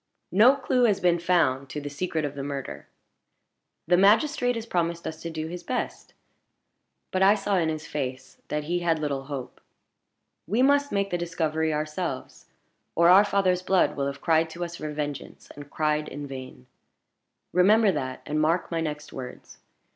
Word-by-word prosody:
"No 230 +9 +6
clue 255 -2 +1
has 210 -4 +2
been 175 -1 +2
found 145 -7 +1
to 150 - -4
the 145 - -7
secret 155 +1 -2
of 145 - -4
the 140 - -6
murder. 140 -1 -6 1.0
The 175 +2 +4
magistrate 245 - +3
has 225 -1 -4
promised 170 -5 -1
us 160 0 -6
to 170 - -5
do 160 -1 -4
his 175 +2 -6
best; 250 +7 -4 1.0
but 185 - 0
I 195 +2 +6
saw 200 -1 0
in 165 -3 +1
his 155 -1 -4
face 130 -3 -5
that 150 0 -2
he 175 +4 -1
had 170 -2 +1
little 140 -3 -3
hope. 135 -3 -7 0.9
We 220 +8 +2
must 285 +1 +3
make 200 0 0
the 175 - -1
discovery 160 -2 -1
ourselves, 150 -1 -4 0.5
or 170 0 +5
our 190 +3 +8
father's 195 -3 +1
blood 185 0 +2
will 140 -1 -1
have 140 0 -6
cried 160 -1 +2
to 175 +2 -4
us 170 0 -8
for 155 - -5
vengeance, 145 -2 -6
and 145 0 -10
cried 150 0 0
in 145 +2 -6
vain. 130 -2 -9 0.9
Remember 205 +4 +5
that, 130 -6 -4
and 150 +1 -1
mark 165 +4 +1
my 165 -1 -1
next 150 -1 -5
words. 130 -2 -9
165 Hz, 175 wpm, -26 LUFS, 145-185 Hz, 1.0 s, our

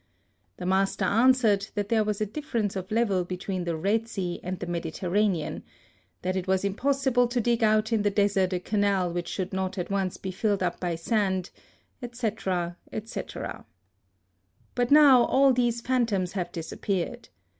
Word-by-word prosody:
The - - -6
master 190 +1 +1
answered 220 -1 +3
that 205 -1 -2
there 225 -2 +3
was 210 -1 -2
a 215 - +1
diflFer 240 +2 -4
ence 205 -2 -1
of 190 0 -5
level 215 -5 +1
between 180 0 -4
the 170 -2 -2
Eed 225 +3 +2
Sea 185 -6 -4
and 180 +1 -4
the - - -4
Mediterranean 175 +1 -1 0.3
— - - -39
that 185 +1 -1
it 185 0 -3
was 190 +1 +1
impossible 255 +3 +1
to 240 +1 -1
dig 235 0 +1
out 215 +1 +3
in 220 - +2
the 205 - +2
desert 200 -2 +2
a 180 - 0
canal 195 -2 0
which 175 -1 -3
should 185 +1 -4
not 190 +1 -2
at 180 +1 -3
once 195 -2 -1
be 190 - -5
filled 200 0 0
up 175 -1 -1
by 175 -2 -1
sand, 190 0 -1 0.5
&c., 240 -2 -2
&c. 185 +2 -4 1.5
But 245 -1 0
now 285 -4 +7
all 270 0 +4
these 240 -1 +1
phantoms 230 -8 0
have 180 -3 -3
dis 165 -2 -6
appeared. 205 +5 -3
200 Hz, 175 wpm, -27 LUFS, 185-230 Hz, 1.5 s, now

